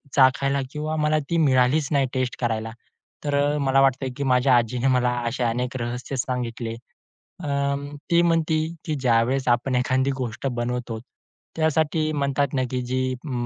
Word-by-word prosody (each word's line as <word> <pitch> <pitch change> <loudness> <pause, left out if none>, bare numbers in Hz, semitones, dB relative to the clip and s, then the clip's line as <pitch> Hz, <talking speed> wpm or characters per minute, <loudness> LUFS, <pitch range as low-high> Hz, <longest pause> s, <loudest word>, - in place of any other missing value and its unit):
चाखायला 135 +1 +4
किंवा 155 +1 -3
मला 155 0 +2
ती 170 - +1
मिळालीच 135 -1 +3
नाही 140 -3 +2
टेस्ट 130 -1 -1
करायला." 115 -2 -1 0.5
तर 145 -1 0
अ, 145 +1 +2
मला 135 -1 +3
वाटतं, 135 0 +2
की 140 - -2
माझ्या 125 -1 +4
आजीने 120 +2 0
मला 125 0 +2 0.2
असे 115 +2 -2
अनेक 125 +2 -1
रहस्य 125 +3 -4
सांगितले. 120 -2 -3 0.7
अं, 140 0 -2 0.2
ती 170 0 +5
म्हणते, 165 -2 +2 0.3
की 155 - -1
"ज्यावेळेस 130 0 +1
आपण 120 +2 +1
एखादी 130 +2 +1
गोष्ट 120 +2 -3
बनवतो, 120 -2 -3 0.6
त्यासाठी 155 0 +1
म्हणतात 140 0 0
ना, 130 - +1
की 125 -1 -1
जी 130 0 0
अं, 130 +3 -8
130 Hz, 155 wpm, -24 LUFS, 125-145 Hz, 0.7 s, ती